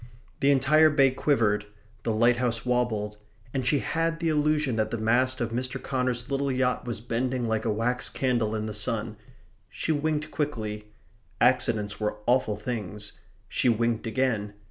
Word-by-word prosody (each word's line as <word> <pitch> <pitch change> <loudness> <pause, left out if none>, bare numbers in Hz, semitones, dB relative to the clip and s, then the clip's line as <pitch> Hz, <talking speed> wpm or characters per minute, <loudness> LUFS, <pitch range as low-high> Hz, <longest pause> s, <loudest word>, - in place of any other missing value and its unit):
The 140 - +3
entire 145 +3 +5
bay 140 -3 +4
quivered; 110 -7 +1 0.3
the 115 - -1
lighthouse 120 +1 +2
wobbled; 110 -4 0 0.4
and 130 -2 -1
she 145 - +4
had 165 +3 -1
the 165 -1 0
illusion 150 -4 +1
that 110 0 +1
the 115 - -3
mast 125 +4 +2
of 120 -2 -2
Mr. 130 +3 -3
Connor's 125 -2 -2
little 140 0 0
yacht 125 -1 0
was 120 -2 -3
bending 120 +2 -2
like 110 -1 -1
a - - +1
wax 120 +4 0
candle 120 -5 0
in 110 0 -2
the 110 - -4
sun. 110 0 0 0.5
She - - -2
winked 150 0 -1
quickly. 110 -8 -3 0.5
Accidents 115 -4 +2
were 105 -1 -1
awful 120 -3 +2
things. 105 -2 -5 0.4
She 125 - +2
winked 115 0 0
again. 110 -4 0
120 Hz, 160 wpm, -27 LUFS, 110-135 Hz, 0.5 s, entire